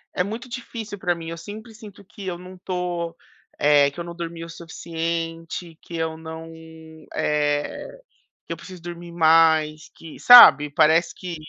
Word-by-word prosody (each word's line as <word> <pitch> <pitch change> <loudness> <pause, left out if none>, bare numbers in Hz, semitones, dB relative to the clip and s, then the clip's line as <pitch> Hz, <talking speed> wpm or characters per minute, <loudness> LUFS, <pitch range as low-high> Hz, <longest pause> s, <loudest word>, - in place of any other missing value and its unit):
é 180 - +1
muito 225 +6 -6
difícil 230 -4 -7
pra 180 -2 0
mim, 165 -1 -9
eu 165 - -6
sempre 215 +6 -10
sinto 210 -3 -13
que 200 +1 -12
eu 180 -2 -4
não 185 +1 -12
tô 175 -2 -4 0.4
eh, 145 -1 +4
que 145 - -12
eu - - -3
não 170 0 -8
dormi 170 -1 -6
o - - -12
suficiente, 165 0 -5
que 170 - -8
eu 160 -1 -2
não, 160 0 -9 0.6
eh, 150 - -2 0.5
que - - -9
eu - - -4
preciso 185 -3 -12
dormir 175 0 -9
mais, 160 -2 +3
que 165 -2 -12
sabe? 150 - +9
Parece 160 +4 +3
que 180 -2 -7
170 Hz, 165 wpm, -23 LUFS, 160-185 Hz, 0.6 s, sabe